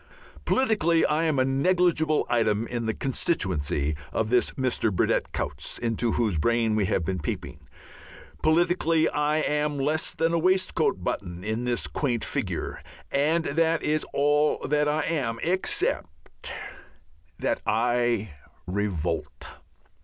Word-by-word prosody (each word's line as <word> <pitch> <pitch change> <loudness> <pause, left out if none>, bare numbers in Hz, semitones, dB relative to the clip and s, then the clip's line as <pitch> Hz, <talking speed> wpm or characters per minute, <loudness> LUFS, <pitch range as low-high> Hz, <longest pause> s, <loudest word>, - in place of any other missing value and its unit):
Politically 190 -10 +2
I 155 +2 +1
am 155 -3 +1
a 130 - +3
negligible 160 +2 +2
item 115 -2 +1
in 115 -1 -3
the 110 - 0
constituency 80 - 0 0.2
of 110 0 -1
this 125 -1 +3
Mr. 125 -4 0
Burdett 90 - 0
Coutts - - -3
into 115 0 -1
whose 105 -9 +1
brain 115 +3 +2
we 105 -2 +2
have 90 -2 0
been 95 +1 -2
peeping. 75 - -5 0.8
Politically 165 0 +3
I 150 +1 +1
am 150 -1 0
less 150 +4 0
than 165 +1 +1
a 170 - +2
waistcoat 185 - +1
button 90 -2 -4
on 110 +3 -2
that 120 -11 +1
quaint 120 - -1
figure. - - -3 0.3
And 155 +4 +2
that 165 +2 +1
is 155 +1 +1
all 145 +1 +2
I 150 +1 +2
am 130 -9 -1
except 165 - -2 0.9
that - - -1
I 120 -2 +1 0.3
revolt. 90 -4 -3
135 Hz, 130 wpm, -26 LUFS, 110-155 Hz, 0.9 s, a